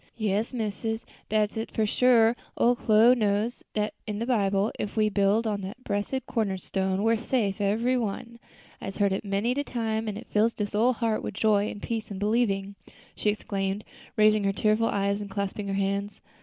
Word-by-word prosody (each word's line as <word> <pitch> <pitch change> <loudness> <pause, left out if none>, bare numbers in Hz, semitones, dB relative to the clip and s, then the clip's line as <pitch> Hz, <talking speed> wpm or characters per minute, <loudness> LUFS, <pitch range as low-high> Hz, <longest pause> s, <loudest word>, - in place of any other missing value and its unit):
"Yes, 215 0 0
missus, 225 -1 -3 0.2
dat's 215 -1 +1
it 225 - -3
for 220 - +1
sure; 230 +1 +4 0.2
ole 245 +1 +4
Chloe 225 +1 +5
knows 215 0 0
dat's 210 0 -1
in 210 -1 -3
de 230 - -2
Bible; 200 -4 +2
an' - - -1
if - - -14
we 215 -1 +3
be - - -14
built 205 +3 +3
on 205 -2 -1
dat 195 +5 -6
bressed 210 +5 -2
corner 210 -5 -1
stone, 190 +1 -1
we's 225 0 +3
safe 215 -7 0
ebery 230 +6 +2
one; 235 +2 -5 0.4
I'se 195 - -6
heard 200 -2 +2
it 190 - -2
many's 200 +4 0
de 285 - +1
time, 225 -4 -2
an' 205 -1 -3
it 230 - -8
fills 220 +2 +2
dis 205 -1 -4
ole 235 +5 +3
heart 225 -2 -1
with 205 - -5
joy 210 -1 +2
an' 205 - -8
peace 225 -2 -3
in 200 - -6
believing," 205 -2 0 0.4
she 210 - 0
exclaimed, 200 -1 -2 0.3
raising 215 -1 +5
her 195 0 +1
tearful 215 +2 +2
eyes 200 0 0
and 205 - -6
clasping 200 +1 -3
her 195 - -1
hands. 200 +1 -1
210 Hz, 200 wpm, -27 LUFS, 200-225 Hz, 0.4 s, Chloe